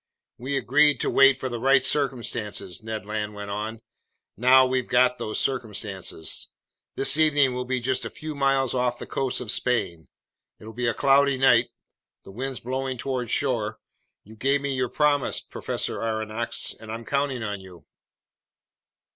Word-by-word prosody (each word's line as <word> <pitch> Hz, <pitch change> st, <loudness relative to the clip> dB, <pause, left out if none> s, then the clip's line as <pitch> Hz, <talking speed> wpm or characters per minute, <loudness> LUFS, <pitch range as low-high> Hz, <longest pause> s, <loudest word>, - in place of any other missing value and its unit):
"We 135 Hz, +3 st, -2 dB
agreed 145 Hz, +2 st, +3 dB
to -, -, 0 dB
wait 135 Hz, -1 st, +5 dB
for 130 Hz, -, -3 dB
the 120 Hz, -2 st, -4 dB
right 135 Hz, +2 st, +4 dB
circumstances," 120 Hz, -, -1 dB
Ned 110 Hz, -2 st, -6 dB
Land 105 Hz, 0 st, -4 dB
went 100 Hz, 0 st, -7 dB
on. 110 Hz, +2 st, -5 dB, 0.5 s
"Now 130 Hz, +3 st, +6 dB
we've 130 Hz, -1 st, -1 dB
got 125 Hz, 0 st, +3 dB
those 110 Hz, -, -2 dB
circumstances. 105 Hz, -, -2 dB, 0.5 s
This 135 Hz, -, +5 dB
evening 145 Hz, -4 st, +4 dB
we'll 125 Hz, 0 st, -3 dB
be 130 Hz, 0 st, -1 dB
just 130 Hz, +1 st, 0 dB
a -, -, -4 dB
few 155 Hz, 0 st, -7 dB
miles 135 Hz, -2 st, +1 dB
off 125 Hz, -1 st, 0 dB
the -, -, -8 dB
coast 130 Hz, -1 st, -2 dB
of 115 Hz, -3 st, -1 dB
Spain. 85 Hz, -, -1 dB, 0.5 s
It'll 110 Hz, +1 st, -11 dB
be 120 Hz, 0 st, 0 dB
cloudy 140 Hz, +2 st, +3 dB
tonight. 135 Hz, 0 st, +4 dB, 0.5 s
The -, -, -12 dB
wind's 130 Hz, +4 st, -5 dB
blowing 130 Hz, +1 st, -3 dB
toward 125 Hz, -2 st, -3 dB
shore. 115 Hz, -5 st, -1 dB, 0.5 s
You 110 Hz, +2 st, -15 dB
gave 135 Hz, +5 st, +1 dB
me 140 Hz, -1 st, -2 dB
your 130 Hz, -2 st, -1 dB
promise, 145 Hz, -2 st, +1 dB
Professor -, -, -4 dB
Aronnax, 110 Hz, 0 st, -2 dB
and 110 Hz, 0 st, -9 dB
I'm 115 Hz, +1 st, -6 dB
counting 140 Hz, -3 st, -1 dB
on 105 Hz, -2 st, -4 dB
you." 90 Hz, -4 st, -15 dB
125 Hz, 160 wpm, -25 LUFS, 110-135 Hz, 0.5 s, Now